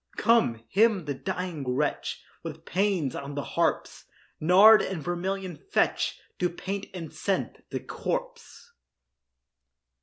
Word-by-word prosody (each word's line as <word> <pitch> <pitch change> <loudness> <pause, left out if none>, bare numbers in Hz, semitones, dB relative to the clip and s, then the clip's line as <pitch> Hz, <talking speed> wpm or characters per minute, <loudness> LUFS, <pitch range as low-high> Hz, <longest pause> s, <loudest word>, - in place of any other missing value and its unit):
Come, 220 - +3
hymn 205 -3 +3
the 145 - -2
dying 165 -5 -3
wretch 150 +2 -1 0.2
With 160 -1 -8
pæans 185 -8 0
on 140 0 -6
the 145 - -2
harps; - - -1 0.3
Nard 195 +7 +8
and 190 -3 -3
vermilion 185 +2 -3
fetch 400 - 0 0.2
To 180 - +2
paint 195 +3 -5
and 170 -4 -7
scent - - -2
the - - -4
corpse. - - -5
180 Hz, 120 wpm, -27 LUFS, 150-195 Hz, 0.3 s, Nard